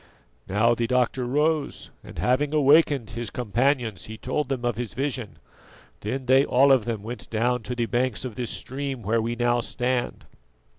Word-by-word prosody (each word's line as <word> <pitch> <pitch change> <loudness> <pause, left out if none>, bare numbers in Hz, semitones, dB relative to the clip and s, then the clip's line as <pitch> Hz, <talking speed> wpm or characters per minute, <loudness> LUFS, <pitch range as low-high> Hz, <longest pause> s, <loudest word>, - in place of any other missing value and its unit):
"Now 110 +5 +3
the 115 0 -1
doctor 125 0 +1
rose, 150 +2 0
and - - -12
having 140 +4 +1
awakened 145 -4 +4
his 120 -2 -4
companions, 120 - 0
he 110 0 -8
told 130 +4 -2
them 130 -3 -2
of 120 -2 0
his 115 -4 -5
vision. 130 -5 -3 0.6
Then 130 +5 -4
they 130 +2 +5
all 135 +1 +4
of 130 -5 +4
them 115 -4 -3
went 120 +3 -7
down 120 +2 0
to 125 +3 -4
the 120 -1 0
banks 120 0 -1
of 125 - -5
this 120 +2 -3
stream 135 -2 -3
where 115 +3 +1
we 115 +1 -2
now 120 0 +2
stand. 125 +1 -2
125 Hz, 180 wpm, -25 LUFS, 115-135 Hz, 0.6 s, they